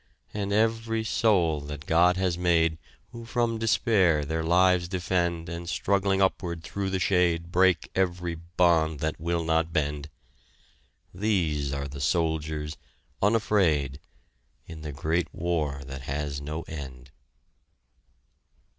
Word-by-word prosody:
And 100 -1 -3
every 115 +1 +1
soul 90 -9 +2
that 75 0 -8
God 90 +3 +4
has 95 -2 +1
made, 85 -2 +2 0.3
Who 115 -1 -9
from 115 -1 -1
despair 100 - +2
their 80 +3 -2
lives 90 +1 +3
defend 85 -2 -1
And 85 +1 -6
struggling 100 +1 +1
upward 85 -3 -1
through 100 +1 -3
the 95 - 0
shade, 85 -2 +1
Break 90 -2 +3
every 90 -2 -1
bond 85 -2 +1
that 80 -1 -2
will 85 +1 -1
not 80 0 +1
bend, 75 -2 -2 1.0
These 85 -8 0
are 70 0 -3
the 70 0 -8
soldiers, 80 -1 -1 0.4
unafraid 95 -10 +2 0.7
In 80 -2 -10
the 75 -1 -5
great 80 +4 -1
war 75 -5 -1
that 65 0 -7
has 70 +1 -4
no 75 +3 -5
end. 65 -4 -9
85 Hz, 125 wpm, -27 LUFS, 75-95 Hz, 1.0 s, God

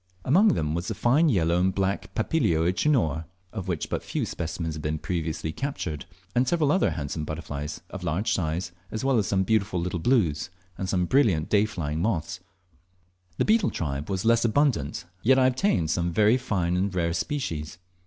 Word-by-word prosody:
Among 195 +10 +5
them 75 0 -1
was 85 +1 -2
the - - -2
fine 145 +7 +3
yellow 85 - +2
and 95 +1 +1
black 95 0 -1
Papilio 95 - +1
euchenor, 90 - +1 0.3
of 95 -4 -5
which 85 -4 -2
but - - -2
few - - -2
specimens 80 -1 -4
had 75 - -6
been 75 +1 -1
previously 80 -1 -3
captured, 105 - -4 0.3
and 125 +4 +2
several 155 -1 +2
other 190 - +3
handsome 75 0 -4
butterflies 75 -1 -5
of 95 -3 -7
large 90 +5 0
size, 85 +1 -2 0.2
as 110 +4 -4
well 135 -4 +3
as 100 - 0
some 95 -1 +2
beautiful 100 -2 +1
little 90 +1 -2
"blues," 85 - +1 0.3
and 95 +1 -4
some 90 -1 +1
brilliant 100 - +2
dayflying 90 -8 +1
moths. 90 -4 -1 1.0
The - - +2
beetle 220 +1 +3
tribe 70 -1 -3
were 95 - 0
less 115 0 +4
abundant, 115 - +1 0.2
yet 130 +3 +4
I 130 - +5
obtained 125 - +1
some 85 0 0
very 105 +6 +4
fine 95 -9 -1
and 95 +1 0
rare 85 -2 +1
species. 80 - -3
90 Hz, 180 wpm, -26 LUFS, 80-115 Hz, 1.0 s, Among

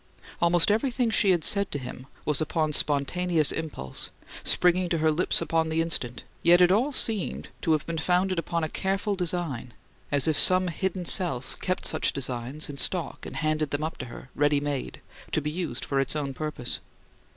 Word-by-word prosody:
Almost 170 +2 +4
everything 240 +1 0
she 205 - +3
had 175 -4 +2
said 200 -1 +3
to - - -3
him 130 0 -9 0.2
was 150 0 0
upon 155 -1 -1
spontaneous 155 +3 +1
impulse, 150 - -5 0.3
springing 180 0 +2
to 170 - 0
her 155 0 +2
lips 170 +4 +1
on 160 -1 +1
the 160 +1 -1
instant; 125 -8 -3 0.2
yet 175 +1 +5
it 180 0 +5
all 240 +9 +2
seemed 220 -7 -1
to 160 - +2
have 155 -2 -1
been 165 -1 -4
founded 180 +2 +1
upon 170 0 -2
a - - 0
careful 195 +5 -2
design, 170 -10 -3 0.4
as 145 0 +2
if 155 -2 +3
some 185 0 +8
hidden 185 +2 -3
self 165 -9 +3
kept 185 -1 -2
such - - +1
designs 130 +2 -4
in 145 - -8
stock 170 +1 -2
and - - -9
handed 155 -1 -1
them 145 +2 -3
up 160 - -5
to 125 - -6
her, 125 +2 -12
ready 145 0 +2
made, 145 -2 -4 0.3
to - - +3
be 150 0 -4
used 175 +1 -4
for 140 - -1
its 135 +2 -1
own 140 -3 -3
purpose. 150 -4 -3
160 Hz, 190 wpm, -26 LUFS, 145-180 Hz, 0.4 s, some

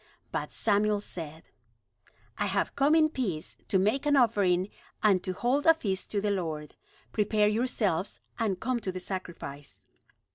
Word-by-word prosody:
But - - -3
Samuel 210 -1 +2
said: 160 -5 -7 0.8
"I 205 - -1
have 195 0 0
come 285 +3 +4
in 310 -1 +5
peace 195 - -3
to 195 - +2
make 215 +10 +1
an 290 - +4
offering 200 -6 +3 0.3
and 195 -4 +4
to 185 - -2
hold 260 - +1
a 325 - +8
feast 195 -11 -2
to 205 - 0
the 205 0 0
Lord. 160 -6 -3 0.4
Prepare 210 0 +2
yourselves 210 -5 0 0.2
and 205 -5 0
come 250 +3 0
to 195 -4 -3
the 185 - -5
sacrifice." 170 -7 -7
205 Hz, 155 wpm, -29 LUFS, 185-235 Hz, 0.8 s, a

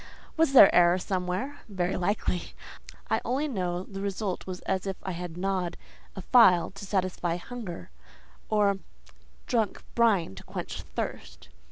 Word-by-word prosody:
Was 320 -4 +2
there 250 - +9
error 175 0 +5
somewhere? 185 +9 -3
Very 185 -3 -1
likely. 180 -1 -1 0.6
I - - +2
only 275 +5 0
know 180 -8 -2
the 195 0 -8
result 200 -1 -3
was 185 -1 -5
as 190 0 -2
if 195 - -3
I 190 - -3
had 175 -1 -6
gnawed 185 -2 -1 0.4
a 190 - -7
file 185 -9 +5
to 195 +1 -9
satisfy 185 -3 -1
hunger, 180 - -7 0.6
or 205 -2 +2 0.7
drank 225 -4 0
brine 215 - +3
to 95 - -11
quench - - -6
thirst. - - -6
190 Hz, 145 wpm, -28 LUFS, 180-210 Hz, 0.7 s, there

